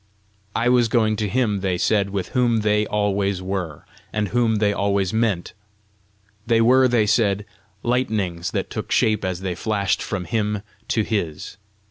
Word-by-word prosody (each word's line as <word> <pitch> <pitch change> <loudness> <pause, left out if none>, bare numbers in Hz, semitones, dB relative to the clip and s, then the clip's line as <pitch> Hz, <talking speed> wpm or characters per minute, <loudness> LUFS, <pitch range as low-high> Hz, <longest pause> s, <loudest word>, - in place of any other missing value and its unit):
I 115 - +1
was 125 -1 +4
going 110 -2 +2
to 105 -1 -1
him, 110 -3 +1
they 95 -2 -1
said, 100 +1 +1
with 95 -2 -3
whom 120 -3 +2
they 105 0 +2
always 100 -2 0
were, 95 -5 -4 0.3
and 105 -2 -1
whom 115 -1 +2
they 105 -1 +2
always 100 -1 0
meant; 110 -6 0 0.9
they 115 0 +3
were, 130 +3 +5
they 120 -3 +2
said, 100 -2 +2 0.4
lightnings 105 -9 -1
that - - -3
took - - -5
shape 110 -2 +2
as 95 -1 -2
they 95 -2 -2
flashed 100 +2 -1
from 95 -3 -3
him 105 0 -1 0.2
to 110 - +1
his. 100 -5 -3
105 Hz, 160 wpm, -22 LUFS, 95-115 Hz, 0.9 s, were